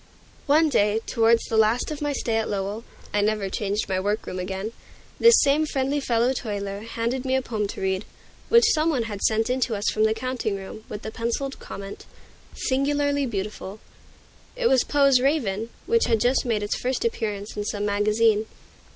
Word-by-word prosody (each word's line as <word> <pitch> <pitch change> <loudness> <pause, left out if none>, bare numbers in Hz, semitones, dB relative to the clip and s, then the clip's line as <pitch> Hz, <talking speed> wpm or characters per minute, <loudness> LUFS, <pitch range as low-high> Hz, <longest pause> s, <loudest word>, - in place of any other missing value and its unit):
One 310 +3 +5
day, 210 -6 +2
towards 230 -1 +3
the 225 - -2
last 220 +6 +2
of 300 0 -5
my 290 0 0
stay 230 -5 -1
at 225 - -1
Lowell 205 +2 -3 0.3
(I 205 - +2
never 210 -1 0
changed 205 +1 -1
my 190 -1 0
work 205 +3 -1
room 185 - -5
again), 190 +3 -4 0.5
this 465 0 +7
same 290 +2 +3
friendly 275 0 0
fellow 240 -1 +1
toiler 200 -5 -4
handed 230 +3 -3
me 260 0 0
a 265 - +2
poem 215 -4 -2
to - - -7
read, 190 +1 0 0.5
which 460 -1 +6
some 310 0 +2
one 265 -7 +1
had 205 -3 -6
sent 220 0 +2
in 255 +1 0
to 240 -3 0
us 205 +1 -2
from 215 0 +2
the 220 0 +2
counting 255 -4 -2
room, 195 +2 -8
with 210 - -7
the 220 - -5
penciled 235 +5 -3
comment, 195 0 -9 0.5
"Singularly 285 +1 0
beautiful." 210 -1 -5 0.8
It - - -3
was 265 - +4
Poe's 275 -3 +4
"Raven," 235 -6 0 0.2
which 465 0 +3
had 225 -2 +2
just 250 +4 +2
made 220 -4 0
its 205 - -1
first 255 - -2
appearance 210 - -3
in 210 - -2
some 205 0 -3
magazine. 210 +1 +2
225 Hz, 190 wpm, -24 LUFS, 205-265 Hz, 0.8 s, this